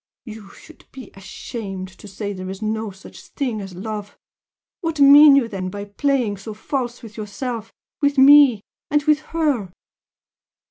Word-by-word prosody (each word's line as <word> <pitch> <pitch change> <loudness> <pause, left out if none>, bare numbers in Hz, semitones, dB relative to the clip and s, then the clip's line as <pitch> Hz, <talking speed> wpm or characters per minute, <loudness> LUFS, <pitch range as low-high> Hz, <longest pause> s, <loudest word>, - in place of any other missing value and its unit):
You 215 -3 -10
should 320 - -17
be 265 -1 -11
ashamed 195 -1 -7
to - - -12
say 205 +1 -5
there 185 -1 -7
is 190 0 -7
no 220 0 -3
such 190 0 -14
thing 245 -7 -4
as 195 -2 -9
love! 205 +1 -7 0.6
What 325 -3 -4
mean 285 +1 +8
you 270 -4 +2
then 190 -4 -5
by 200 +1 -7
playing 235 0 -1
so 210 +2 -9
false 245 +1 -4
with 220 -1 -12
yourself? 225 +2 -6 0.3
with 285 0 +1
me? 270 -5 +7 0.3
and 295 0 +1
with 300 0 +3
HER?" 295 - -2
220 Hz, 155 wpm, -21 LUFS, 200-280 Hz, 0.6 s, mean